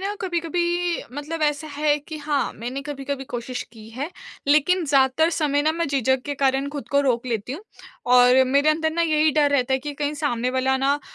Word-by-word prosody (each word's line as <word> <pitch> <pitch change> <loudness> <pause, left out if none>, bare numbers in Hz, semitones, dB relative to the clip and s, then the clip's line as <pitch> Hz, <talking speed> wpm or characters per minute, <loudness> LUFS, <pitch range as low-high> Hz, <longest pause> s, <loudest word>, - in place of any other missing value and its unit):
ना 400 +2 -3
कभी-कभी 345 0 -1
मतलब 305 +3 -5
ऐसा 295 0 0
है 295 0 +1
कि 305 +2 -9
हाँ, 290 -1 -1
मैंने 250 +5 -6
कभी-कभी 275 -1 -5
कोशिश 245 0 -5
की 220 -2 -13
है, 270 +8 -5 0.4
लेकिन 305 +5 +3
ज़्यादातर 275 +3 +3
समय 290 -3 +1
ना 310 - +2
मैं 335 +1 -1
झिझक 265 -2 +1
के 290 - -2
कारण 270 0 +1
ख़ुद 285 -4 -7
को 280 - +3
रोक 255 -3 0
लेती 230 0 -3
हूँ 305 - -6 0.5
और 250 +1 +6
मेरे 280 +3 +2
अंदर 315 +1 +2
ना 335 +1 +1
यही 310 -1 +3
डर 295 -1 +3
रहता 265 -2 +1
है 265 - +3
कि 290 +2 -6
कहीं 290 +1 -2
सामने 250 -5 -1
वाला 260 +1 +1
ना 270 +1 +2
अ, 290 - -5
285 Hz, 210 wpm, -23 LUFS, 265-310 Hz, 0.5 s, और